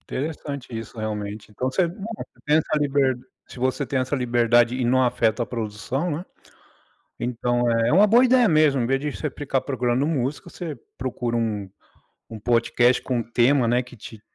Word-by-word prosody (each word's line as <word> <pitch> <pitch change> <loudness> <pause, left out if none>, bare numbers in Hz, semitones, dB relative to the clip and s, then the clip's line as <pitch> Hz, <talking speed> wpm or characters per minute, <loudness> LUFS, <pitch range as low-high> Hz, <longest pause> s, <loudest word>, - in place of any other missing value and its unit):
Interessante 140 -1 -4
isso 115 +1 -8
realmente. 105 -1 -5
Então 130 +5 -2
você, 175 +4 +2
né. 170 - -8 0.2
Você - - -11
tem 150 +1 +4
essa 155 -1 0
liber 135 -3 +2 0.3
se 125 - -11
você 130 +2 0
tem 130 +2 -1
essa 130 +3 -1
liberdade 120 -1 +3
e 130 - -1
não 130 +1 +3
afeta 120 -1 +1
a - - -6
produção, 115 - -3
né. 165 +6 -4 0.9
Então 120 0 0
é 115 +3 +2
uma 200 +5 +6
boa 240 +5 +5
ideia 250 -3 +5
mesmo, 155 -4 +4
em 115 - +1
vez 135 +1 +1
de 150 0 -2
você 150 - -4
ficar 135 -1 -2
procurando 130 0 0
música, 140 -2 -2
você 160 -6 -6 0.2
procura 120 -2 -2
um 105 -4 -2 0.6
um 110 -1 -8
podcast 120 +2 +2
com 125 -2 -1
um - - -2
tema, 120 +2 +3
né, 120 +1 +3
que 125 0 -13
te 110 -1 -11
125 Hz, 190 wpm, -23 LUFS, 120-145 Hz, 0.9 s, uma